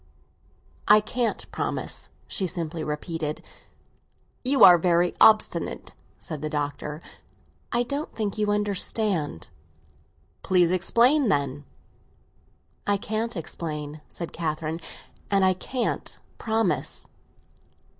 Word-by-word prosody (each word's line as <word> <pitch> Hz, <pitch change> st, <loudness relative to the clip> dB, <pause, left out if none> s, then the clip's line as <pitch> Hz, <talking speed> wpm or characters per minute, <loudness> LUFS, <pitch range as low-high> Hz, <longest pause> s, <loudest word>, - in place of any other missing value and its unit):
"I 210 Hz, +1 st, +8 dB
can't 230 Hz, +2 st, -2 dB
promise," -, -, -3 dB, 0.2 s
she 190 Hz, -, -1 dB
simply 165 Hz, -1 st, -3 dB
repeated. 155 Hz, 0 st, -3 dB, 1.0 s
"You 265 Hz, +2 st, +4 dB
are 175 Hz, -2 st, +10 dB
very 175 Hz, 0 st, +2 dB
obstinate," 215 Hz, -1 st, +3 dB, 0.2 s
said 155 Hz, -5 st, -6 dB
the 155 Hz, -, -2 dB
Doctor. 150 Hz, +1 st, -3 dB, 0.7 s
"I 240 Hz, 0 st, +2 dB
don't 280 Hz, +5 st, -3 dB
think 210 Hz, -3 st, -2 dB
you 210 Hz, -1 st, +1 dB
understand." 200 Hz, -, 0 dB, 0.9 s
"Please 180 Hz, -2 st, +3 dB
explain, 235 Hz, -, +3 dB
then." 140 Hz, -3 st, 0 dB, 1.2 s
"I 205 Hz, 0 st, +3 dB
can't 220 Hz, +2 st, -2 dB
explain," 150 Hz, -2 st, -5 dB
said 170 Hz, -, -7 dB
Catherine. 160 Hz, 0 st, -2 dB, 0.5 s
"And 195 Hz, -1 st, +3 dB
I 185 Hz, -, +4 dB
can't 240 Hz, +7 st, -3 dB, 0.2 s
promise." 225 Hz, 0 st, -1 dB
180 Hz, 100 wpm, -26 LUFS, 155-215 Hz, 1.2 s, are